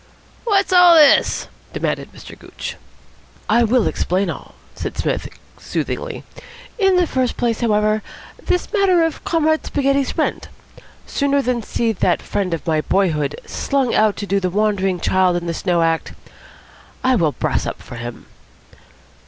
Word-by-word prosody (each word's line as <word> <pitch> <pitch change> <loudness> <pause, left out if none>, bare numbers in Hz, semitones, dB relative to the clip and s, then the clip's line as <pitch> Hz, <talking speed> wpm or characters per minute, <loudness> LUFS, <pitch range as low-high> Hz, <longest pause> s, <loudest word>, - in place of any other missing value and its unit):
"What's 395 -4 +2
all 355 -1 +7
this?" 300 -3 +5 0.3
demanded - - -3
Mr. - - -12
Gooch. - - -8 0.7
"I 235 +2 +4
will 235 0 +2
explain 185 0 0
all," - - -10 0.2
said - - -6
Psmith - - -2 0.3
soothingly. - - -4 0.6
"In 385 -2 +4
the 360 -1 +4
first 260 -5 -1
place, 235 -2 0
however, 215 -1 +2 0.4
this 360 - -1
matter 380 -5 +3
of 325 -1 -2
Comrade 315 -1 +1
Spaghetti's 275 -1 0
rent. - - -1 0.6
Sooner 280 0 0
than 250 -2 0
see 230 +1 -1
that 215 - +1
friend 195 -3 -2
of 165 - -3
my 155 -2 +1
boyhood 155 -6 0
slung 275 -4 -1
out 215 -1 +3
to 205 - -4
do 200 0 +1
the 185 -1 -1
wandering 195 -2 0
child 185 -1 +2
in 175 - -5
the 170 - -2
snow 170 0 0
act, 165 0 -1 0.9
I 260 - +3
will 165 -9 +1
brass - - -1
up - - -5
for 120 - -10
him." 120 -1 -7
215 Hz, 155 wpm, -19 LUFS, 185-280 Hz, 0.9 s, all